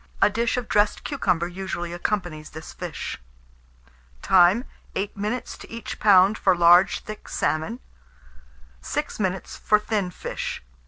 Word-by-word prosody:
A - - +5
dish 235 +3 0
of 245 -2 -3
dressed 210 0 +2
cucumber 180 - 0
usually 175 -1 -5
accompanies 175 -4 -3
this 155 +1 -9
fish. - - -6 1.0
Time. 190 +6 +5 0.3
8 200 +1 -2
minutes 210 +5 -3
to - - -12
each 230 0 -7
lb. 200 +1 +6
for 190 -2 +4
large 175 +2 +5
thick 215 0 -9
salmon; 160 +10 -1 1.0
6 65 - -3
minutes 190 -2 -2
for 210 - +3
thin 210 -3 -1
fish. 180 - -5
190 Hz, 130 wpm, -24 LUFS, 175-215 Hz, 1.0 s, lb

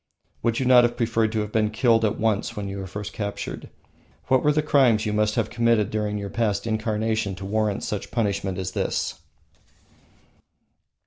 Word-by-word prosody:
Would 115 0 0
you 130 - -1
not 125 -1 +7
have 120 0 0
preferred 115 -2 +1
to 110 - 0
have 105 0 -5
been 110 -1 +2
killed 115 0 +2
at 110 - +1
once 110 -2 0
when 100 -1 -3
you 100 0 -5
were 95 - -5
first 105 +2 -6
captured? 100 -3 -5 0.6
What 130 -1 +4
were 150 - +3
the 150 +1 +1
crimes 125 -7 +3
you 105 - -1
must 105 0 +1
have - - -1
committed 115 -3 +2
during 105 -1 -1
your 100 -1 -5
past 105 -3 -1
incarnation 110 -2 -1
to 95 - -8
warrant 105 0 -1
such 105 -2 -4
punishment 100 -4 -1
in 95 - -3
this? - - -2
110 Hz, 185 wpm, -24 LUFS, 105-115 Hz, 0.6 s, not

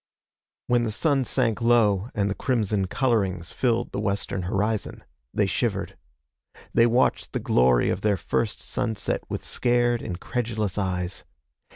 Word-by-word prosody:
When 120 -1 +2
the 115 - -1
sun 135 +4 +1
sank 120 -3 0
low 115 -3 +3
and 100 -2 +1
the 100 - 0
crimson 105 -5 0
colorings 95 -8 0
filled 120 -2 0
the - - -3
western 100 -2 -2
horizon, 105 +4 -2 0.3
they - - +1
shivered. - - -1 0.8
They 115 - +5
watched 120 +2 +1
the - - 0
glory 60 -1 +3
of 95 - -2
their 105 -1 +2
first 110 +3 -2
sunset 110 -4 -2
with - - -4
scared, 120 -1 +1
incredulous 110 +1 -3
eyes. 90 -2 -2
110 Hz, 140 wpm, -25 LUFS, 95-120 Hz, 0.8 s, They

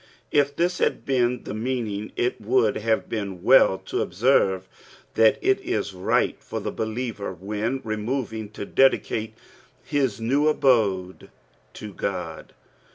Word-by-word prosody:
^ 145 -1 +3
this 175 +3 0
had - - 0
been 125 -2 +1
Vie - - -6
meaning, 110 -3 -3
U 120 +1 +2
ymiid 115 -1 +1
have 110 0 0
been 100 -4 -4
meii 115 -6 +5
to - - -2
observe 95 -6 +2 0.5
Otal 110 -1 +5
it 395 +1 +2
ia 105 - 0
right 90 0 0
for - - -5
Ute - - -5
bkieaer 110 -4 -4
when 105 +8 -3
remooing, 110 0 -3
to 100 - -6
dedieaie 110 -3 +2 0.5
his 130 -7 0
nea 135 +7 +1
abode 105 -11 +1 0.5
la - - -7
God. - - -5
115 Hz, 135 wpm, -24 LUFS, 105-130 Hz, 0.5 s, meii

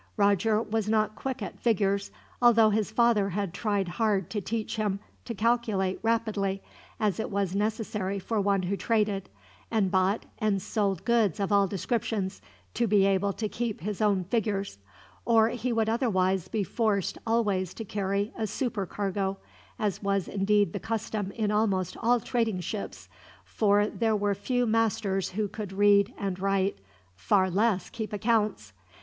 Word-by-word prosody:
Roger 205 +1 +3
was 220 -2 -2
not 215 -1 +1
quick 260 -3 -4
at - - -7
figures, 200 -3 +1 0.3
although 230 -3 +6
his 210 -1 0
father 220 -3 +3
had 195 -1 -2
tried 205 -3 -1
hard 195 -1 0
to 210 - -2
teach 225 +2 -3
him 205 -2 0 0.3
to 235 - -5
calculate 215 -4 +1
rapidly, 215 -4 0 0.4
as 210 -3 0
it - - -2
was 195 -3 -1
necessary 210 -1 -1
for 210 +2 -1
one 195 -1 +1
who 185 +3 -1
traded, 210 -2 0 0.4
and 210 -5 +1
bought 190 +3 +1
and 210 -3 +1
sold 195 -2 -1
goods 230 -7 +2
of 200 0 -1
all 200 -1 +4
descriptions, 200 -1 -2 0.3
to 235 - +1
be 200 -2 +4
able 195 0 +2
to 215 +2 -3
keep 230 0 -3
his 205 +3 -4
own 200 -3 +2
figures; 200 - -2 0.4
or 225 -1 +4
he 245 +1 -2
would 225 -2 +1
otherwise 190 -6 +1
be 215 -3 -1
forced 205 -1 0
always 205 -6 +1
to 225 - -6
carry 200 +1 -2
a 220 - -2
supercargo, 200 -4 -2 0.4
as 205 -3 -1
was 200 -2 0
indeed 205 +1 +2
the 200 - -3
custom 215 -2 -3
in 215 -2 -1
almost 200 -4 +1
all 240 +1 +3
trading 225 -5 -1
ships, 200 +4 -5 0.4
for 205 -1 +2
there 220 +1 0
were 205 -1 +1
few 245 +4 0
masters 215 -4 +1
who 210 +2 -2
could 205 -1 -6
read 200 +2 +4
and 190 -2 -3
write, 195 - 0 0.3
far 140 - +2
less 200 -1 +1
keep 220 -3 -5
accounts. 210 - 0
205 Hz, 160 wpm, -28 LUFS, 195-225 Hz, 0.4 s, although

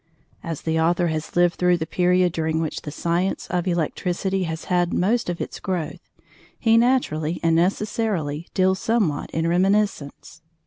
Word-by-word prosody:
As 165 -3 -5
the 160 0 0
author 170 +1 +2
has 155 0 -4
lived 175 0 +3
through 180 -1 +3
the 160 - -3
period 180 +1 +2
during 160 0 -1
which 160 -2 -3
the - - -7
science 170 +5 -1
of 180 0 -1
Electricity 180 +2 -1
has 160 -1 -5
had 175 -1 0
most 225 +3 +1
of 175 - -3
its - - -5
growth, 180 -5 -3 0.6
he 225 -1 +3
naturally 230 -10 +1
and 165 -1 +3
necessarily 180 -4 -1
deals 190 0 +2
somewhat 205 -11 0
in 160 0 -2
reminiscence. 180 -4 0
175 Hz, 155 wpm, -23 LUFS, 160-190 Hz, 0.6 s, lived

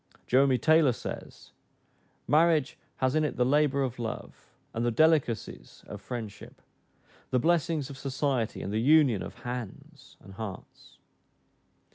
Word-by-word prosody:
Jeremy 130 0 +3
Taylor 155 +1 +4
says, - - -8 0.8
"Marriage 155 -2 +3 0.2
hath 130 0 +1
in 155 - +2
it 150 - -2
the 125 - +2
labor 140 0 +2
of 125 -2 -4
love, 115 -2 -7 0.2
and 115 - -2
the 120 - +2
delicacies 145 -2 0
of 105 - -9
friendship; 110 -1 -8 0.7
the 130 - +1
blessings 160 0 +1
of 135 -2 -10
society, 130 -3 -2
and 100 - -4
the 110 - 0
union 140 -5 +4
of - - -8
hands 120 -5 -8
and 95 - -14
hearts." 100 -2 -9
130 Hz, 135 wpm, -28 LUFS, 115-150 Hz, 0.8 s, Taylor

